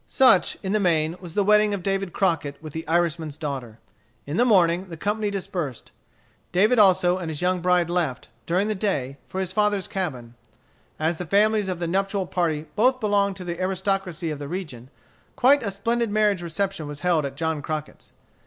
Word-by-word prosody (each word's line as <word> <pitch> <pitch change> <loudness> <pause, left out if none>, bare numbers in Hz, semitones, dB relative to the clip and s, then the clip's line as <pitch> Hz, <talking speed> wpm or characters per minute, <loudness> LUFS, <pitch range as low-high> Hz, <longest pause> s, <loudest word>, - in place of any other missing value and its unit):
Such, 255 -9 +4
in 190 - -2
the 215 - +2
main, 165 -4 +1
was 175 -3 -10
the 205 - +3
wedding 210 0 +4
of 185 - -7
David 195 -1 -1
Crockett 165 -7 0
with 155 -2 -9
the 160 0 -6
Irishman's 165 -2 0
daughter. 135 -8 -5 0.5
In 145 - -4
the 235 - +4
morning 185 -4 +3
the 165 - -7
company 210 +4 -1
dispersed. 175 - -5 0.6
David 210 +7 +3
also 185 -2 +4
and 170 -3 -4
his 155 +2 -4
young 180 0 +1
bride 180 -1 +3
left, 170 -7 -2 0.2
during 185 +5 +1
the 215 - 0
day, 145 -10 -2
for 190 - -4
his 190 -1 -2
father's 205 -1 +1
cabin. 130 -12 -4 0.6
As 160 +2 0
the 180 - -5
families 210 +2 +3
of 185 - -2
the 170 - -3
nuptial 195 +2 0
party 160 -4 -1
both 255 +4 +3
belonged 200 -3 +1
to 185 - -8
the 175 0 -5
aristocracy 190 -3 -1
of 150 - -5
the 145 - -6
region, 140 -8 -6 0.5
quite 275 +3 +5
a 215 - -2
splendid 230 +4 -1
marriage 205 -3 +2
reception 175 -1 -3
was 145 0 -8
held 175 -4 +2
at 140 -1 -4
John 160 0 -2
Crockett's. 155 +1 -6
180 Hz, 190 wpm, -24 LUFS, 160-200 Hz, 0.6 s, quite